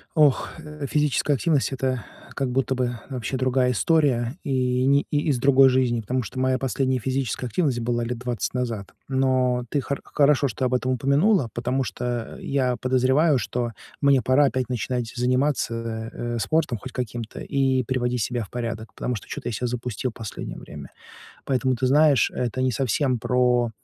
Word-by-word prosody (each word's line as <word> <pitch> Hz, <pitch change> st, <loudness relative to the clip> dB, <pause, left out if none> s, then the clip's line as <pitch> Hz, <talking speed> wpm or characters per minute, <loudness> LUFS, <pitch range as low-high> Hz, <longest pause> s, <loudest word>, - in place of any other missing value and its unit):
Ох, 150 Hz, -4 st, +4 dB
э, 150 Hz, -2 st, -7 dB
физическая 150 Hz, -1 st, +2 dB
активность 145 Hz, -1 st, +1 dB
это 130 Hz, -3 st, -1 dB, 0.3 s
как 135 Hz, -2 st, -1 dB
будто 130 Hz, +1 st, 0 dB
бы 120 Hz, -2 st, -1 dB
вообще 130 Hz, 0 st, -3 dB
другая 130 Hz, 0 st, +2 dB
история 135 Hz, -3 st, +2 dB
и, 130 Hz, -2 st, +1 dB
ни 140 Hz, +1 st, +4 dB
из 145 Hz, -3 st, +1 dB
другой 135 Hz, +1 st, +6 dB
жизни, 125 Hz, -2 st, +1 dB
потому 125 Hz, +4 st, -1 dB
что 130 Hz, -, -7 dB
моя 130 Hz, 0 st, +1 dB
последняя 130 Hz, 0 st, 0 dB
физическая 130 Hz, 0 st, -2 dB
активность 130 Hz, 0 st, 0 dB
была 120 Hz, 0 st, -1 dB
лет 120 Hz, +1 st, -3 dB
20 125 Hz, -2 st, -3 dB
назад. 115 Hz, -6 st, -3 dB
Но 130 Hz, -2 st, +1 dB
ты 145 Hz, -, 0 dB
хор 140 Hz, +2 st, -4 dB
хорошо, 145 Hz, -1 st, +3 dB
что 130 Hz, -, -2 dB
об 125 Hz, -, 0 dB
этом 125 Hz, +1 st, 0 dB
упомянула, 140 Hz, -, +2 dB
потому 125 Hz, +3 st, -1 dB
что 120 Hz, -2 st, -4 dB
я 130 Hz, -3 st, 0 dB
подозреваю, 130 Hz, +4 st, +3 dB
что 120 Hz, -1 st, -2 dB, 0.3 s
мне 140 Hz, -2 st, +4 dB
пора 130 Hz, +5 st, +4 dB
опять 130 Hz, -3 st, -1 dB
начинать 125 Hz, -1 st, -2 dB
заниматься, 120 Hz, -3 st, 0 dB
э, 120 Hz, 0 st, -3 dB
спортом 125 Hz, +4 st, 0 dB
хоть 130 Hz, +5 st, -9 dB
каким-то 120 Hz, -2 st, -5 dB
и 135 Hz, -2 st, +1 dB
приводить 125 Hz, -1 st, -1 dB
себя 120 Hz, +2 st, -1 dB
в 100 Hz, -, -12 dB
порядок, 115 Hz, -2 st, -5 dB
потому 125 Hz, -, -3 dB
что 105 Hz, -, -8 dB
чё-то -, -, -5 dB
я -, -, -4 dB
себя 125 Hz, +3 st, -2 dB
запустил 125 Hz, 0 st, -3 dB
последнее 110 Hz, -2 st, -7 dB
время. -, -, -10 dB, 0.5 s
Поэтому, 130 Hz, -1 st, +1 dB
ты 130 Hz, +2 st, 0 dB
знаешь, 145 Hz, -1 st, +4 dB
это 125 Hz, +1 st, -2 dB
не 130 Hz, -1 st, +1 dB
совсем 130 Hz, +2 st, 0 dB
про 125 Hz, -1 st, +2 dB
130 Hz, 170 wpm, -24 LUFS, 120-135 Hz, 0.5 s, другой